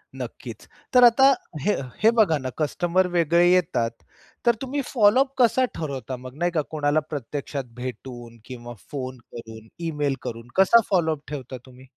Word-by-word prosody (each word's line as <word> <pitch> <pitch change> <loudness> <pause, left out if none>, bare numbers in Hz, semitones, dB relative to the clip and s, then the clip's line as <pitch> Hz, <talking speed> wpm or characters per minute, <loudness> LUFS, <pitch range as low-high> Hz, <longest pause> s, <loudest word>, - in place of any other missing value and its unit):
नक्कीच. - - -8 0.3
तर 250 -1 +7
आता 265 +3 +7 0.3
हे 205 +9 +2 0.3
हे 225 - +7
बघा 165 -8 +4
ना, 130 -2 -5
कस्टमर 175 +4 +1
वेगळे 170 +1 +4
येतात. 120 -10 +1 0.5
तर 235 - +4
तुम्ही 275 +2 -2
फॉलो 225 -1 +4
अप 270 0 +1
कसा 255 +2 +4
ठरवता? 135 -4 -5
मग 130 +1 -11
नाही 175 +1 0
का 160 - 0
कोणाला 150 -1 +1
प्रत्यक्षात 140 0 -5
भेटून 125 -1 -8
किंवा 120 -2 -9 0.2
फोन 130 -2 -5
करून, 110 -1 -10 0.2
ईमेल 145 -3 -1
करून, 115 +1 -7
कसा 195 +5 +6
फॉलो 175 -5 +2
अप 145 - -19
ठेवता 130 -3 -6
तुम्ही? 130 0 -16
150 Hz, 160 wpm, -24 LUFS, 130-190 Hz, 0.5 s, तर